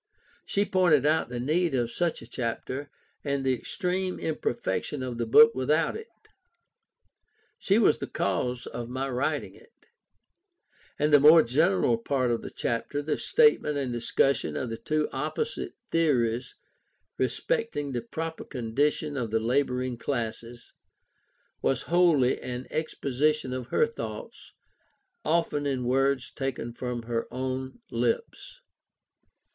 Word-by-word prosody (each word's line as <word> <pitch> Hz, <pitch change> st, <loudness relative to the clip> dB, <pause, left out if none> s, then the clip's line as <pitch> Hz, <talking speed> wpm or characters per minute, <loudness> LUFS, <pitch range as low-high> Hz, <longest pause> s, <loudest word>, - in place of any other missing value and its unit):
She 200 Hz, +1 st, +1 dB
pointed 175 Hz, -8 st, +3 dB
out 155 Hz, -4 st, +2 dB
the 125 Hz, -1 st, -4 dB
need 155 Hz, +4 st, +1 dB
of 120 Hz, -2 st, 0 dB
such 170 Hz, -2 st, -1 dB
a -, -, -12 dB
chapter, 130 Hz, +3 st, -4 dB, 0.3 s
and 140 Hz, -2 st, -1 dB
the 130 Hz, -, +3 dB
extreme 185 Hz, -, -2 dB
imperfection 130 Hz, -3 st, -2 dB
of 125 Hz, -2 st, -5 dB
the 115 Hz, -, -1 dB
book 230 Hz, -, +8 dB
without 150 Hz, +5 st, +1 dB
it; 445 Hz, +1 st, -7 dB, 1.5 s
she 195 Hz, -, +2 dB
was 230 Hz, -, +4 dB
the -, -, -4 dB
cause 120 Hz, +6 st, -1 dB
of 120 Hz, -1 st, -6 dB
my 130 Hz, +2 st, -2 dB
writing 135 Hz, +3 st, -1 dB
it; 460 Hz, 0 st, -22 dB, 1.1 s
and 150 Hz, 0 st, +1 dB
the 145 Hz, -, +9 dB
more 155 Hz, +3 st, +8 dB
general 145 Hz, -1 st, +2 dB
part 130 Hz, 0 st, 0 dB
of 115 Hz, -, -1 dB
the -, -, -7 dB
chapter, 140 Hz, +5 st, -2 dB
the 150 Hz, -, -1 dB
statement 435 Hz, -, +3 dB
and 130 Hz, -3 st, -2 dB
discussion 120 Hz, +3 st, +1 dB
of 120 Hz, -, -3 dB
the 115 Hz, -, -4 dB
two 155 Hz, +4 st, 0 dB
opposite 155 Hz, -, -3 dB, 0.2 s
theories 125 Hz, -7 st, +1 dB, 0.6 s
respecting 145 Hz, -, -1 dB
the 120 Hz, -2 st, -2 dB
proper 160 Hz, +7 st, -5 dB
condition 145 Hz, +4 st, -1 dB
of 120 Hz, -4 st, -2 dB
the 110 Hz, +1 st, +1 dB
labouring 125 Hz, 0 st, 0 dB
classes, 120 Hz, -2 st, -4 dB, 0.9 s
was 135 Hz, -, +1 dB
wholly 165 Hz, -7 st, +3 dB
an 125 Hz, 0 st, -5 dB
exposition 150 Hz, -2 st, 0 dB
of 130 Hz, -2 st, -4 dB
her 465 Hz, -, +3 dB
thoughts, 460 Hz, 0 st, -8 dB, 0.7 s
often 160 Hz, -3 st, +1 dB
in 130 Hz, -3 st, -1 dB
words 135 Hz, +1 st, +1 dB
taken 130 Hz, -3 st, -4 dB
from 125 Hz, -1 st, -4 dB
her 115 Hz, 0 st, -2 dB
own 130 Hz, -, -4 dB
lips. 475 Hz, +1 st, -2 dB
135 Hz, 135 wpm, -27 LUFS, 125-155 Hz, 1.5 s, the